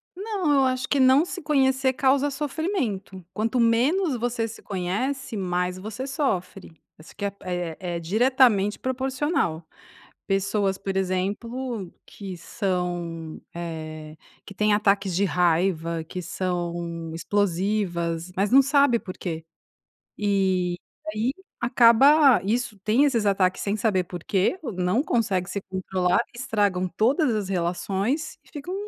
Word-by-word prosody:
Não, 390 Hz, -6 st, -1 dB
eu 270 Hz, -1 st, +4 dB
acho 255 Hz, 0 st, 0 dB
que 280 Hz, -, +2 dB
não 260 Hz, +4 st, +6 dB
se 360 Hz, 0 st, -6 dB
conhecer 265 Hz, -3 st, +2 dB
causa 275 Hz, +2 st, +2 dB
sofrimento, 270 Hz, -, -3 dB
quanto 225 Hz, +3 st, 0 dB
menos 260 Hz, +8 st, +3 dB
você 235 Hz, -1 st, -1 dB
se 225 Hz, -, -10 dB
conhece, 215 Hz, +7 st, -3 dB
mais 180 Hz, -1 st, -1 dB
você 220 Hz, +7 st, -6 dB
sofre, 195 Hz, -, -2 dB, 0.3 s
isso 155 Hz, -, -15 dB
que 205 Hz, -, -4 dB
é 200 Hz, -, -2 dB
é 175 Hz, -3 st, -3 dB, 0.2 s
é -, -, -2 dB
diretamente 220 Hz, +2 st, +3 dB
proporcional. 260 Hz, -, -1 dB, 0.6 s
Pessoas, 195 Hz, 0 st, 0 dB
por 195 Hz, -1 st, -4 dB
exemplo, 200 Hz, +3 st, -2 dB
que 195 Hz, -3 st, -8 dB
são, 175 Hz, -5 st, -3 dB
eh, 155 Hz, -2 st, -7 dB, 0.3 s
que 200 Hz, -, -10 dB
têm 210 Hz, +2 st, +2 dB
ataques 200 Hz, -2 st, +2 dB
de 200 Hz, -, +2 dB
raiva, 170 Hz, -2 st, +1 dB
que 180 Hz, +3 st, -6 dB
são 170 Hz, -2 st, -3 dB
explosivas, 175 Hz, -2 st, -1 dB
mas 200 Hz, +4 st, +1 dB
não 270 Hz, +1 st, +8 dB
sabe 275 Hz, -3 st, +3 dB
porquê, 170 Hz, -4 st, -6 dB, 0.7 s
e 190 Hz, -3 st, +1 dB, 0.4 s
aí, 225 Hz, +5 st, 0 dB, 0.3 s
acaba 250 Hz, +3 st, +6 dB
isso 220 Hz, +1 st, -1 dB
tem 220 Hz, +8 st, +3 dB
esses 230 Hz, -7 st, +1 dB
ataques 190 Hz, -2 st, +2 dB
sem 205 Hz, +1 st, -1 dB
saber 200 Hz, -5 st, +1 dB
porquê, 185 Hz, -, -1 dB
ou 245 Hz, -, -4 dB
não 185 Hz, +7 st, +1 dB
consegue 200 Hz, -, 0 dB
se 200 Hz, +1 st, -3 dB
controlar 185 Hz, -1 st, +1 dB
e -, -, -11 dB
estragam 205 Hz, -6 st, 0 dB
todas 255 Hz, +2 st, +2 dB
as 205 Hz, -3 st, -2 dB
relações 195 Hz, -, -1 dB
e -, -, -25 dB
ficam 320 Hz, +4 st, -6 dB
205 Hz, 135 wpm, -25 LUFS, 180-255 Hz, 0.7 s, não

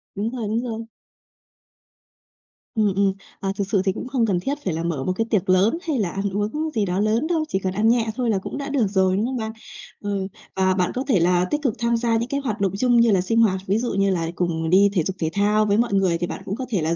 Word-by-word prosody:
Đúng 205 Hz, +3 st, -1 dB
rồi, 235 Hz, -3 st, -4 dB
đúng 225 Hz, +3 st, 0 dB
rồi. 230 Hz, -2 st, -4 dB, 1.9 s
Ừm, 210 Hz, -3 st, +2 dB
ừm, 195 Hz, -1 st, +2 dB, 0.3 s
à, 195 Hz, -, -1 dB
thực 200 Hz, -, -1 dB
sự 195 Hz, -, +3 dB
thì 190 Hz, -, +3 dB
cũng 250 Hz, -, -6 dB
không 255 Hz, -3 st, +1 dB
cần 195 Hz, -5 st, +1 dB
thiết 275 Hz, +10 st, -2 dB
phải 185 Hz, -, 0 dB
là 165 Hz, +1 st, -3 dB
mở 160 Hz, -6 st, -2 dB
một 185 Hz, -, 0 dB
cái 225 Hz, -, 0 dB
tiệc 200 Hz, -5 st, 0 dB
lớn 195 Hz, -, +4 dB
hay 295 Hz, -5 st, +1 dB
là 190 Hz, -5 st, 0 dB
ăn 195 Hz, +2 st, -2 dB
uống 215 Hz, +11 st, -2 dB
gì 210 Hz, -2 st, +2 dB
đó 180 Hz, +1 st, -1 dB
lớn 220 Hz, +7 st, +1 dB
đâu, 330 Hz, -2 st, +1 dB
chỉ 190 Hz, -, -1 dB
cần 185 Hz, -1 st, -2 dB
ăn 215 Hz, +3 st, +2 dB
nhẹ 230 Hz, -1 st, +2 dB
thôi 245 Hz, -1 st, -1 dB
là 210 Hz, -, +2 dB
cũng 190 Hz, -, -5 dB
đã 280 Hz, 0 st, -4 dB
được 255 Hz, -7 st, +1 dB
rồi, 190 Hz, -1 st, +2 dB
đúng 210 Hz, -, +1 dB
không 255 Hz, +1 st, -2 dB
bạn? 220 Hz, -1 st, -3 dB, 0.5 s
Ờ, 205 Hz, -, -2 dB, 0.4 s
và 190 Hz, 0 st, +2 dB
bạn 180 Hz, -1 st, 0 dB
có 255 Hz, -, -1 dB
thể 215 Hz, -10 st, +3 dB
là 180 Hz, +1 st, +3 dB
tích 295 Hz, -, 0 dB
cực 255 Hz, -7 st, +1 dB
tham 235 Hz, 0 st, +1 dB
gia 230 Hz, -1 st, +1 dB
những 235 Hz, +2 st, -2 dB
cái 280 Hz, -, -1 dB
hoạt 220 Hz, -6 st, -3 dB
động 195 Hz, -, +2 dB
chung 245 Hz, +2 st, +3 dB
như 230 Hz, -2 st, +4 dB
là 185 Hz, -2 st, +3 dB
sinh 225 Hz, +5 st, +1 dB
hoạt, 190 Hz, -4 st, +2 dB
ví 195 Hz, +3 st, +2 dB
dụ 240 Hz, +1 st, -2 dB
như 195 Hz, 0 st, +2 dB
là 170 Hz, -3 st, 0 dB
cùng 165 Hz, -2 st, -1 dB
đi 195 Hz, +3 st, +5 dB
thể 175 Hz, -5 st, +2 dB
dục 190 Hz, +3 st, -3 dB
thể 160 Hz, -, 0 dB
thao 210 Hz, +1 st, +2 dB
với 205 Hz, 0 st, +2 dB
mọi 235 Hz, -2 st, +1 dB
người 190 Hz, -3 st, +2 dB
thì 175 Hz, +1 st, -2 dB
bạn -, -, -6 dB
cũng 195 Hz, -, -3 dB
có 260 Hz, -, -4 dB
thể 200 Hz, -7 st, 0 dB
là 160 Hz, +2 st, 0 dB
205 Hz, 285 wpm, -23 LUFS, 185-235 Hz, 1.9 s, đi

